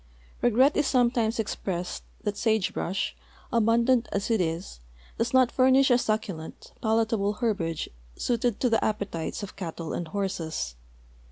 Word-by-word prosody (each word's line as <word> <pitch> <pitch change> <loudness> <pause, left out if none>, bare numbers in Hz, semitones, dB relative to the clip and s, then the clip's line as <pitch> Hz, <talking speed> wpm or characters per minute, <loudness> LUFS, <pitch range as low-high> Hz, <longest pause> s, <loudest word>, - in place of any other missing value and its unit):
Regret 255 +5 +4
is 295 - +2
sometimes 240 -3 +2
exj>ressed 180 -5 -3 0.2
that 210 -1 -1
sagebrush, 205 -3 0 0.4
almndant 235 +2 +3
as 200 +3 -1
it 220 -4 +3
is, 165 - -3 0.4
does 230 +1 +1
not 255 -2 +4
furnish 260 +1 +5
a 245 - +6
succulent, 215 -8 -3
palatable 220 -2 +1
herbage 195 -9 -1 0.3
suited 240 -2 0
to 255 - +2
the 225 -2 +3
ap})etites 205 -4 -2
of 200 - -7
eattle 165 -3 -5
and 175 - -3
horses. 165 - -3
220 Hz, 135 wpm, -27 LUFS, 185-235 Hz, 0.4 s, a